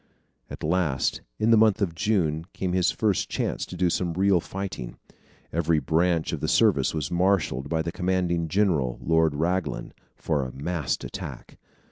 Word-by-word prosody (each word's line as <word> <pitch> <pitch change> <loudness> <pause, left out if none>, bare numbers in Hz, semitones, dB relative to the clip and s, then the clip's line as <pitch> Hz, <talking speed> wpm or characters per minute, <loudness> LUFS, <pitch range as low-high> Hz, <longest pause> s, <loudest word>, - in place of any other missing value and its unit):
At - - -8
last, 80 -6 0 0.2
in 110 +2 +2
the 115 - +7
month 110 -2 +4
of 95 -5 0
June, 85 -5 0
came 90 -2 -2
his 90 -1 +3
first 105 -4 0
chance - - -2
to 90 - -8
do 90 -1 +2
some 85 -1 -1
real 95 +1 +3
fighting. 90 -10 -6 0.6
Every 85 0 +2
branch 80 +1 +1
of - - -2
the - - -2
service - - +3
was 75 -3 -3
marshalled 85 -7 +1
by 80 -1 0
the 85 - -3
commanding 90 -2 0
general, 75 -10 +1
Lord 80 +3 +2
Raglan, 90 +4 -1 0.2
for 75 -4 -1
a 65 - -5
massed 75 +1 -2
attack. - - -8
85 Hz, 165 wpm, -26 LUFS, 80-95 Hz, 0.6 s, the